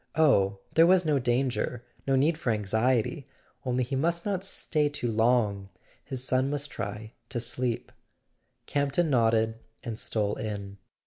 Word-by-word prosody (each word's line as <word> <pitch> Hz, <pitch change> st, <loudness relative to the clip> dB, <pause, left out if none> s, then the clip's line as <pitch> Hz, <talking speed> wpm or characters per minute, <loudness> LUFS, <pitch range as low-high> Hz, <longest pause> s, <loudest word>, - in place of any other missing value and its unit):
Oh, 100 Hz, -11 st, +4 dB, 0.2 s
there 165 Hz, +1 st, +6 dB
was 180 Hz, -1 st, +5 dB
no 150 Hz, -3 st, +2 dB
danger—no 125 Hz, +1 st, -1 dB
need 150 Hz, +5 st, +3 dB
for 155 Hz, -5 st, -3 dB
anxiety; 115 Hz, -, +1 dB, 0.4 s
only 125 Hz, 0 st, 0 dB
he 125 Hz, +3 st, -3 dB
must 170 Hz, +5 st, 0 dB
not 195 Hz, -3 st, -1 dB
stay 155 Hz, -6 st, 0 dB
too 125 Hz, -5 st, -2 dB
long; 110 Hz, -4 st, +2 dB, 0.3 s
his 130 Hz, -3 st, -3 dB
son 130 Hz, +1 st, +1 dB
must 145 Hz, 0 st, -3 dB
try 105 Hz, +1 st, -5 dB, 0.2 s
to 120 Hz, -, -2 dB
sleep. 120 Hz, 0 st, -2 dB, 0.7 s
Camp 140 Hz, -1 st, 0 dB
ton 165 Hz, 0 st, +2 dB
nodded, 115 Hz, -2 st, +2 dB, 0.2 s
and 115 Hz, -2 st, -5 dB
stole 105 Hz, -2 st, -1 dB
in. 100 Hz, -2 st, -5 dB
125 Hz, 145 wpm, -28 LUFS, 110-145 Hz, 0.7 s, there